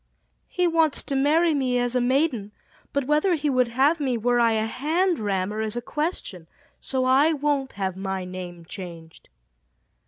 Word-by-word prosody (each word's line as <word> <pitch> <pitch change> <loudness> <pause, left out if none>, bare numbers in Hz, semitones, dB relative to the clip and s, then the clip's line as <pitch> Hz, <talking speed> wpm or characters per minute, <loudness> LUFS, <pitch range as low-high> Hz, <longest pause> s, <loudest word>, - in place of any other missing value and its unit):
"He 360 - 0
wants 325 -3 +2
to 275 - -3
marry 310 +5 +3
me 260 -3 0
as 245 0 0
a 250 - +3
maiden, 245 -5 0 0.4
but 280 -2 -1
whether 305 +6 +2
he 295 -2 -1
would 255 -2 +2
have 275 +8 +2
me 260 -4 0
were 240 +2 +1
I 230 -1 +4
a 220 0 0
hand 325 +9 0
rammer 205 0 -1
is 220 0 -3
a - - +1
question, 240 - -4 0.3
so 260 -1 -2
I 275 +5 +4
won't 285 -2 -1
have 190 -2 -3
my 190 -1 -4
name 180 -2 -8
changed." 170 -3 -10
255 Hz, 175 wpm, -24 LUFS, 205-295 Hz, 0.4 s, I